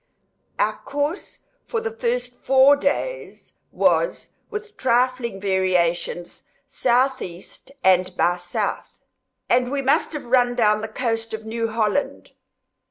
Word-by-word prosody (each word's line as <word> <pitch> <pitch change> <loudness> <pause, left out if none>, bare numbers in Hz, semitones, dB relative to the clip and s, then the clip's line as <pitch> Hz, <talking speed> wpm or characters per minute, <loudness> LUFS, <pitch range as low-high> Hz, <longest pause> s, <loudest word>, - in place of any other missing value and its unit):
Our - - 0
course 290 +6 -4 0.2
for 460 - -1
the 460 0 -3
first 475 +2 -2
four 270 +1 +6
days 395 - -3 0.2
was, - - +1 0.2
with 425 0 -7
trifling 250 -4 +1
variations, 180 -3 0 0.2
S.E. 245 -8 0 0.4
and 185 0 +3
by 175 - +3
S.; 175 0 -12 0.9
and 245 0 +2
we 275 0 -2
must 275 +4 +2
have 300 - -5
run 245 0 +3
down 215 -3 +3
the 220 - -3
coast 225 -1 -2
of 220 0 -10
New 230 +1 -2
Holland. 220 +3 -1
240 Hz, 120 wpm, -22 LUFS, 200-280 Hz, 0.9 s, four